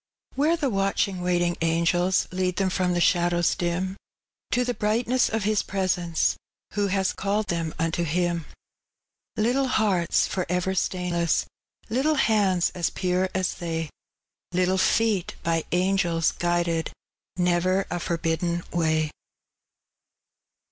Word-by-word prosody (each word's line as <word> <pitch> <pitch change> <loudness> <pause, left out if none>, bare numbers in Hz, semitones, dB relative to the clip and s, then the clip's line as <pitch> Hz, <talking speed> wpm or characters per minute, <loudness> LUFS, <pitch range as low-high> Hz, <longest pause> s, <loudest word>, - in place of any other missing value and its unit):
Whsre 315 +5 +2
the 280 -6 0
watchiD};, 195 -1 0
waitiag 175 -1 +1
angela 170 +2 +2 0.2
Lead 185 -1 -1
them 190 -1 +1
trom 180 -1 +1
tho - - +1
ihadowg 175 -1 +2
dim, 180 +2 -1 0.5
To 250 0 +1
the 245 - -1
brightaesa 235 +4 +1
of 225 -2 -1
His 210 0 +2
presence 180 -4 0 0.4
Who 205 -1 0
bea 195 0 +1
called 205 +1 -1
thom 165 -2 -1
nnto 165 +1 -1
Him,— 170 0 0 0.9
Little 250 +5 +2
hearts 200 -8 +2
for 185 -2 -3
ever 180 +1 0
Btainlesg, 175 -2 0 0.5
Little 280 +6 +2
hands 200 - +2
aa 180 - -8
pure 185 0 0
aa 190 - 0 0.2
they. 165 -2 -3 0.6
Little 185 +1 +1
feet 210 -3 +1
by 165 -1 0
angels 180 -2 +2
guided, 175 -1 0 0.5
Never 180 +2 +2
ft 175 - -2
forbidden 170 0 -1
waj. 160 -2 +1
180 Hz, 125 wpm, -25 LUFS, 170-200 Hz, 0.9 s, Whsre